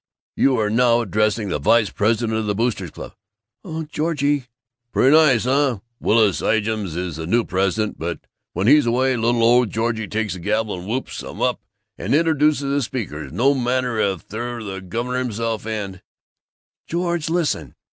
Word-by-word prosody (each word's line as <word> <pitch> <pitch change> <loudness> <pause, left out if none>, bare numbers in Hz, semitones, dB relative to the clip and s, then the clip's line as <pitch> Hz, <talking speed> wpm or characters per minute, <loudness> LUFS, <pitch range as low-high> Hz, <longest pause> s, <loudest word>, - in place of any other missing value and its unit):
You 135 -2 +3
are 105 -1 0
now 120 +1 +4
addressing 105 0 0
the 75 - -1
vice 110 +8 +3
president 110 +1 0
of 110 - -3
the 105 - 0
Boosters' 110 -5 -1
Club!" - - -10 0.5
"Oh, 160 0 -5
Georgie 145 -3 -1 0.2
" 120 0 -58
"Pretty 135 +4 +5
nice, 145 -8 +5
huh? 130 -4 +1 0.2
Willis 105 -4 +3
Ijams 110 -5 0
is 90 -4 -3
the 80 0 -5
new 115 +6 +2
president, 95 +3 -1
but 85 +1 -3 0.3
when 95 +3 -1
he's 145 +1 +5
away, 130 +2 +2
little 115 0 +1
ole 120 +1 +5
Georgie 110 0 -2
takes 110 -1 -2
the 90 - -7
gavel 105 +1 -1
and 90 - -9
whoops 125 +5 -3
'em - - -9
up - - 0 0.4
and - - 0
introduces 155 -2 +2
the 145 - +1
speakers 75 - -5
no 135 +4 +3
matter 125 -2 0
if 95 -5 -1
they're 120 +2 -5
the 95 -2 -6
governor 120 +7 -3
himself 115 -2 -3
and 100 -4 -4 0.4
" - - -64
"George! 170 -2 -1
Listen!" 155 - -1
115 Hz, 175 wpm, -21 LUFS, 105-130 Hz, 0.5 s, Pretty